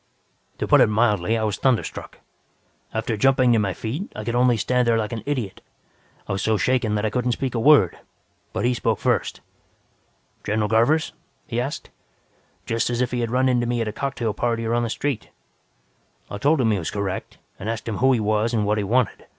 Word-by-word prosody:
"To - - -3
put - - +6
it - - +6
mildly, 105 -1 +1
I 110 - -1
was 105 -1 -1
thunderstruck. 130 -4 -1 0.7
After 110 0 -2
jumping 130 +1 +3
to 115 - +3
my 100 -3 -1
feet, 140 - -5
I 105 - -5
could 115 - -3
only 120 -1 +3
stand 125 +3 +1
there 115 -1 +3
like 110 -1 -2
an 115 - -4
idiot. 125 -9 -3 0.7
I - - -4
was 95 0 -1
so 110 +1 +1
shaken 115 0 +1
that 105 +1 0
I 110 - 0
couldn't 125 0 0
speak 130 +1 -3
a 120 - -1
word. 135 - +5 0.5
But - - -2
he 125 - +3
spoke 115 -3 0
first. 120 -6 -1 1.0
"'General 105 0 0
Garvers?' 120 +8 +2 0.3
he 120 0 -2
asked, 135 +4 -5 0.7
just 115 +1 0
as 120 -1 -1
if 125 -1 0
he 125 - -1
had 115 -1 -1
run 130 +2 +2
into 120 -2 +1
me 120 0 0
at 115 - -1
a 105 - -3
cocktail 120 -4 -2
party 115 +1 -1
or 115 - 0
on 120 - +2
the 120 - -2
street. 135 0 -3 1.0
"I 100 - -5
told 150 +6 +3
him 115 -3 +2
he 105 - +1
was 80 - -3
correct, 100 -2 -4 0.2
and 105 - -4
asked 115 0 -4
him 110 - -2
who 130 +1 +4
he 125 - +2
was 110 +2 0
and 105 -2 +1
what 105 +1 +1
he - - -1
wanted. 120 +4 0
115 Hz, 215 wpm, -23 LUFS, 105-125 Hz, 1.0 s, put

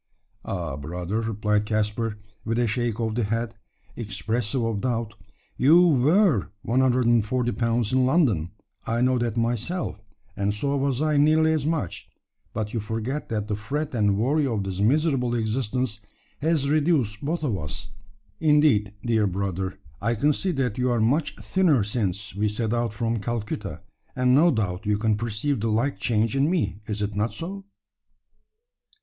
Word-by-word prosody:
"Ah, 65 - -3
brother," 90 +8 -3
replied 105 -1 0
Caspar, 110 0 -1 0.3
with 115 +1 -1
a 120 - +3
shake 120 0 -1
of 110 -2 -1
the 120 +1 0
head, 115 +2 -2 0.4
expressive 115 +2 -2
of 115 -3 -1
doubt, 115 -4 -1 0.4
"you 155 +6 +6
were 150 - +3
140 120 -1 +2
pounds 115 -1 0
in 130 0 +4
London 120 - +2 0.4
I 115 +1 0
know 125 0 +3
that 120 -1 -1
myself 120 - -2 0.3
and 100 0 0
so 140 +6 -1
was 140 0 0
I 155 -1 +2
nearly 155 +2 +4
as 155 -2 -1
much; 155 - -3 0.4
but 105 -1 -4
you 115 - 0
forget 115 +7 -3
that 105 -2 -2
the 105 - -1
fret 145 +8 -3
and 105 -4 +2
worry 140 +6 +2
of 110 -5 -1
this 95 -1 -4
miserable 125 +1 +2
existence 115 0 -1 0.4
has 155 -2 +1
reduced 145 -8 +1
both 160 +3 -2
of 125 -8 0
us. 90 +7 -6 0.5
Indeed, 145 -10 +3
dear 110 -3 +2
brother, 95 0 -3 0.2
I 115 +3 +1
can 145 +7 +2
see 185 +5 -1
that 125 -5 -1
you 125 0 +2
are 120 -1 +1
much 135 +8 +1
thinner 170 - +2
since 100 -2 -2
we 105 +2 0
set 110 +1 -2
out 120 -2 0
from 115 +1 -1
Calcutta; 105 -4 -4 0.3
and 125 0 +3
no 155 +6 +6
doubt 105 - -1
you 105 -1 +2
can 110 0 +1
perceive 115 +5 -2
the 115 - -1
like 120 +6 0
change 110 -1 +1
in 140 +3 +3
me. 170 - 0
Is 105 -1 -2
it 105 0 -2
not 105 +3 0
so?" 195 +4 -5
115 Hz, 165 wpm, -25 LUFS, 105-135 Hz, 0.5 s, you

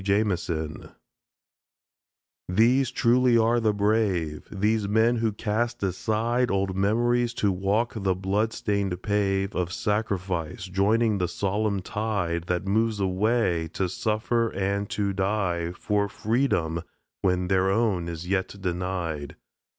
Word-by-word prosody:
JAMISON 90 -6 -1 1.6
These 120 +7 +3
truly 125 -1 +3
are 115 +1 +3
the 110 -2 +2
Brave 100 -7 0
These 105 +1 +1
men 110 +3 +3
who 115 -1 +1
cast 110 +3 -2
aside 110 +6 0
Old 95 -1 0
memories, 120 +4 +1
to 100 - +1
walk 100 +5 0
the 95 -4 0
blood 100 +4 0
stained 100 -5 -1
pave 100 -1 0
Of 90 -1 -1
Sacrifice, 95 -5 -2
joining 105 +3 +2
the 90 - +1
solemn 100 +2 -1
tide 95 -7 -2
That 90 +1 -1
moves 110 +2 +1
away, 95 -2 +1
to 95 - 0
suffer 110 +4 0
and 100 +1 -1
to 100 -1 -1
die 95 -4 -1
For 100 +2 -1
Freedom 100 -8 0 0.4
when 90 -1 +1
their 95 0 +2
own 95 -5 +1
is 85 +1 -6
yet 95 +1 -1
denied! 90 -5 -3
100 Hz, 125 wpm, -26 LUFS, 90-110 Hz, 1.6 s, These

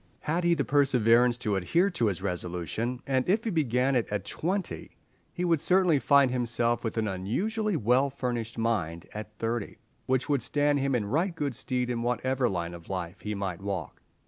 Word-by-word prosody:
Had 165 +4 -1
he 170 0 +4
the - - -1
perseverance 125 -4 +4
to 105 -4 -1
adhere 170 - +2
to 140 -10 +1
his 95 -2 -2
resolution, 90 +7 -3
and 130 +2 0
if 215 +4 +3
he 225 - -1
began 135 - +1
it 120 - +1
at 105 -2 -3
twenty, 185 - -3 0.3
he 180 - -2
would 165 -3 +3
certainly 180 -5 +4
find 140 -2 +4
himself 120 -1 0
with 115 0 -3
an 110 -1 +1
unusually 190 - -1
well 125 +4 +3
furnished 120 -4 -4
mind 95 -8 -1
at 105 0 -8
thirty, 115 -2 -3 0.3
which 130 0 +1
would 140 -3 +1
stand 145 +3 +1
him 135 -1 +1
in 110 -4 0
right 165 - 0
good 145 -4 -2
stead 125 0 -2
in 120 -1 -2
whatever 125 +1 0
line 85 -2 -3
of 85 -1 -11
life 90 -1 -4
he 105 0 -3
might 95 -3 -4
walk. 100 -4 -4
125 Hz, 190 wpm, -28 LUFS, 105-145 Hz, 0.3 s, he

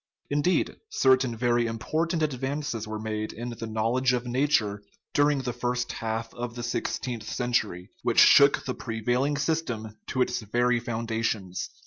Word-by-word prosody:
Indeed, 145 +6 +1
certain 130 - +3
very 120 0 +2
important 155 +9 -1
advances 135 -4 -2
were 110 0 -4
made 110 0 -3
in 120 +2 -5
the 115 -1 -6
knowledge 115 +4 +1
of 125 0 -1
nature 120 -5 +1 0.3
during 145 -2 +3
the 125 -1 -2
first 125 0 -2
half 115 0 -3
of 120 -1 -5
the 120 - -5
six 120 - -1
teenth 120 -4 -5
century, 110 -7 -1
which - - +2
shook 140 0 +7
the 130 - -2
prevailing 125 +6 -1
system 120 -9 -2
to 130 - +2
its - - -2
very 120 +3 +1
foundations. 115 -5 -2
120 Hz, 150 wpm, -27 LUFS, 110-130 Hz, 0.3 s, shook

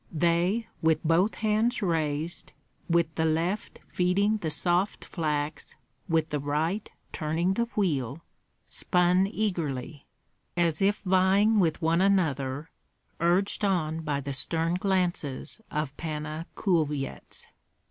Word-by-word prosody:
They, 175 +7 +1 0.2
with 160 -1 +2
both 170 +6 +3
hands 220 +2 +1
raised, 160 -1 -2 0.4
with 170 -1 +2
the 160 - 0
left 165 +6 -1
feeding 200 +4 +2
the 165 -6 -3
soft 175 +5 0
flax, 150 -3 -3 0.3
with 160 -1 +2
the 150 - -1
right 155 +8 -1 0.2
turning 165 +4 0
the 235 +4 +1
wheel, 150 - -1 0.4
spun 180 +1 +2
eagerly, 165 - -3 0.5
as 170 -1 +2
if 205 +2 +2
vying 195 +3 +4
with 165 -2 +1
one 165 +2 +3
another, 150 -7 +1 0.5
urged 180 +5 +1
on 165 -5 +1
by 145 -3 -2
the 140 0 -4
stern 165 +5 +1
glances 180 -4 -1
of 150 -2 -3
Panna 155 0 -4
Kulvyets. 150 -7 -1
170 Hz, 115 wpm, -28 LUFS, 155-190 Hz, 0.5 s, vying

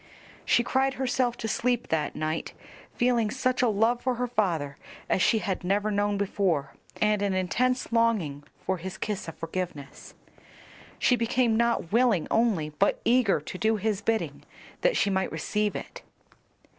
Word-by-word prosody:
She 240 - +3
cried 270 +2 +1
herself 250 -2 0
to 225 - -4
sleep 245 +2 0
that 155 -2 -1
night, 155 +1 -3 0.4
feeling 240 -3 +2
such 255 +1 0
a 250 - +4
love 225 +3 +2
for 255 -1 0
her 250 +1 -1
father 170 - -1 0.3
as - - +1
she 225 - +4
had 195 -4 -2
never 205 +3 +1
known 205 0 +1
before, 185 -8 0 0.3
and 210 -1 +2
an 200 -2 0
intense 250 +9 0
longing 215 -12 +1 0.2
for 190 - 0
his 190 +2 -7
kiss 210 -1 -3
of 165 - -8
forgiveness. 165 -5 -6 0.8
She 250 - +3
became 235 0 +1
not 235 -7 +1
willing 230 -7 +3
only, 215 -10 +2
but 155 +7 +1
eager 235 -6 +3
to 170 - -7
do 220 0 +2
his 210 -1 -1
bidding 225 +1 -1 0.4
that - - +2
she 200 - +2
might 190 0 0
receive 210 +6 -1
it. - - -7
210 Hz, 160 wpm, -27 LUFS, 185-240 Hz, 0.8 s, a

